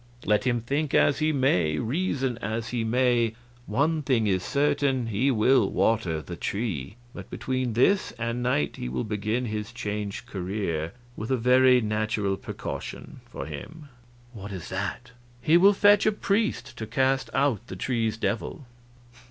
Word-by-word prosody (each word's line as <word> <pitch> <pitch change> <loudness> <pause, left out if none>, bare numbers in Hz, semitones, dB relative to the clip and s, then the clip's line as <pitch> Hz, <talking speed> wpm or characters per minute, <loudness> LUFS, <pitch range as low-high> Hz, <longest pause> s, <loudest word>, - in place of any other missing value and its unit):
Let 105 +3 +2
him 120 -2 +1
think 140 +5 -1
as 145 - +4
he 155 0 +2
may, 90 - +2
reason 130 - -1
as 110 +2 -3
he 120 -2 -1
may, 120 -1 +2 0.3
one 155 +3 +1
thing 130 -6 +1
is 95 -3 +1
certain, 140 -1 +1
he 115 +5 +1
will 120 -2 +4
water 90 -9 +1
the 85 - -7
tree. 100 - -3 0.2
But - - -9
between 130 -2 -2
this 190 - +3
and 120 +1 -3
night 100 -12 0
he 60 - -4
will 65 0 -2
begin 110 +3 -1
his 105 -1 -4
changed 105 -3 -4
career 90 -4 -3 0.2
with 110 - -5
a 130 - +2
very 125 +1 +5
natural 105 -2 0
precaution - - -7
for - - -6
him." 140 - -9 0.4
"What 100 -2 -8
is 95 -3 -7
that?" 100 +6 -4 0.3
"He 155 +7 +3
will 190 +4 +7
fetch 205 +1 +5
a - - +5
priest 210 +1 -1
to 110 - -4
cast 130 +3 +1
out 135 -5 +1
the - - -7
tree's 115 -3 -1
devil. 115 +6 -3
115 Hz, 160 wpm, -26 LUFS, 105-135 Hz, 0.4 s, will